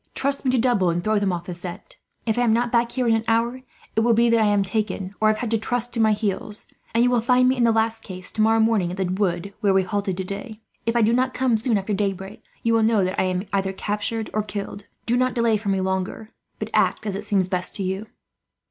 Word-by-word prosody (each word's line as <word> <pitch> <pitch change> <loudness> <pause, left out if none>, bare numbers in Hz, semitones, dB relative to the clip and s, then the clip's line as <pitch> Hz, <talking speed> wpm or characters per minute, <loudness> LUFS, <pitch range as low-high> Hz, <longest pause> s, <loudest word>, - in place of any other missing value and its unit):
Trust 280 +1 +1
me 265 - +1
to 255 - +2
double 225 -7 +2
and 170 +1 -1
throw 215 +1 +2
them 200 -2 +1
off 175 -1 -4
the 180 - -5
scent. 175 - -9 0.3
If 220 -2 +1
I 245 - +1
am 240 -2 +3
not 235 +1 +1
back 235 0 +2
here 255 -2 0
in 230 - +4
an 225 0 +1
hour, 235 +3 +1 0.3
it - - +3
will 230 0 +3
be 235 +1 +4
that 230 -1 +4
I 215 - +4
am 205 -1 +3
taken, 195 -1 -2
or 215 - +4
have 215 0 +3
had 235 -1 -3
to 225 - +2
trust 245 +2 -2
to 230 - -3
my 220 -1 +4
heels; 210 0 -2 0.3
and 230 - +4
you 245 - +3
will 245 -2 +3
find 250 +2 +4
me, 260 - +3
in 245 -2 +2
the 230 - +4
last 225 0 0
case, 185 -3 -8
tomorrow 220 +1 +3
morning 220 -5 +2
at 180 - -6
the 190 - 0
wood 185 0 -1
where 200 -3 +3
we 190 - +4
halted 195 0 -2
today. 200 +4 -6 0.3
If 230 - +1
I 235 - +4
do 225 +2 +3
not 255 +1 +1
come 255 -3 +2
soon 225 0 +1
after 200 +2 -2
daybreak, 195 0 -3 0.2
you 230 - +2
will 225 - +4
know 220 -2 +3
that 185 +1 0
I - - +1
am 185 0 -1
either 195 -1 0
captured 210 +3 -3
or 215 - +1
killed. 205 -1 -6 0.2
Do 235 - +1
not 255 0 +1
delay 230 -2 +3
for 210 -1 -2
me 195 -1 +1
longer, 190 +4 -3 0.3
but - - -5
act - - +2
as 200 -1 -3
seems 195 -3 +2
best 180 -1 -1
to 200 - -3
you." 190 +3 -3
215 Hz, 265 wpm, -23 LUFS, 195-230 Hz, 0.3 s, in